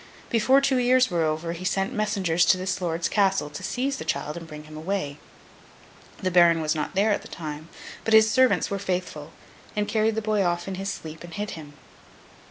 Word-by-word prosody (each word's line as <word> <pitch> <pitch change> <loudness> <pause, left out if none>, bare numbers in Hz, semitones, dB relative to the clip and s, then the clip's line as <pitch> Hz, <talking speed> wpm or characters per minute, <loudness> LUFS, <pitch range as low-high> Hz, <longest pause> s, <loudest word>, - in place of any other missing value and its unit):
Before 260 +4 +4
two 275 -1 +2
years 250 -1 +3
were 170 -1 +1
over, 160 +1 -1
he 170 +2 -8
sent 195 +1 0
messengers 195 -5 +1
to 165 +3 +4
this 185 0 -3
lord's 170 -1 -1
Castle 195 -7 +1
to 145 - -7
seize 270 +2 -2
the - - -5
child 150 -1 -2
and 170 -1 -8
bring 150 -1 -9
him 155 0 -12
away. 155 -3 -3 1.0
The 185 - -2
Baron 170 -2 +5
was 155 -1 0
not 155 +3 -4
there 205 +3 +3
at - - 0
the - - -11
time, 155 -1 -7 0.3
but 225 - +3
his 220 0 +7
servants 250 -10 +3
were 200 - -1
faithful, 180 -5 -3 0.4
and 210 0 0
carried 220 0 +1
the 220 - -1
boy 215 -1 +1
off 175 0 -1
in 195 - -3
his 195 +1 -3
sleep 160 +1 -8
and 170 -1 -9
hid 210 0 -3
him. 150 -3 -9
185 Hz, 210 wpm, -25 LUFS, 160-210 Hz, 1.0 s, his